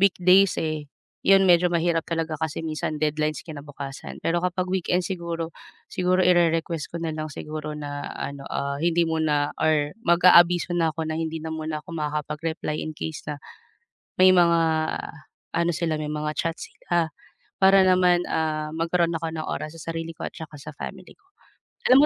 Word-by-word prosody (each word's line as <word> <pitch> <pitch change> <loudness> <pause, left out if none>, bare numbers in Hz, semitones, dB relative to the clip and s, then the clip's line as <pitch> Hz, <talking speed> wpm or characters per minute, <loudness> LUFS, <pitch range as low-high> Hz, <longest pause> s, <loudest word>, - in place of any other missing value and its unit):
weekdays 190 0 +5
eh, 155 -2 -3 0.4
'yon, 195 0 +6
medyo 175 0 +5
mahirap 170 -1 +1
talaga 165 -1 -1
kasi 160 -1 -2
minsan 155 0 -3
deadlines 155 0 -1
kinabukasan. 145 -3 -8
Pero 170 +1 +1
kapag 180 0 -1
weekend 180 -1 +1
siguro, 170 -3 -4 0.4
siguro 185 0 +2
ire-request 165 -2 +2
ko - - -4
nalang 155 -1 -3
siguro 150 +1 -6
na 145 -1 -5
ano, 140 0 -5
ah, 140 0 -2
hindi 170 0 +3
muna 155 -3 +1
or 150 -2 +2
mag-aabiso 175 0 +6
na 165 -2 +2
ako 160 0 -3
na 155 - -2
hindi 160 0 -2
na 160 - -5
muna 155 -1 -3
ako - - -10
makakapag-reply 150 +1 -3
in 155 - -4
case 160 -2 -5
na, 150 - -4 0.8
may 185 0 +8
mga 170 -1 +5 1.0
ano 170 0 +2
sila, 160 -1 0
may 150 -1 -3
mga 150 0 -2
chats 165 0 -2
sila, 170 -2 0 0.5
para 195 0 +7
naman, 180 -1 +4
ah, 155 -1 -1
magkaroon 170 +1 +1
ako 165 - -4
ng 155 -1 -4
oras 155 - -4
sa 165 - -5
sarili 165 0 -4
ko - - -5
at - - -24
tsaka 160 -1 -9
sa 150 - -8
family - - -8
ko. 405 - -36 0.6
Alam 260 +2 +8
165 Hz, 165 wpm, -25 LUFS, 155-175 Hz, 1.0 s, may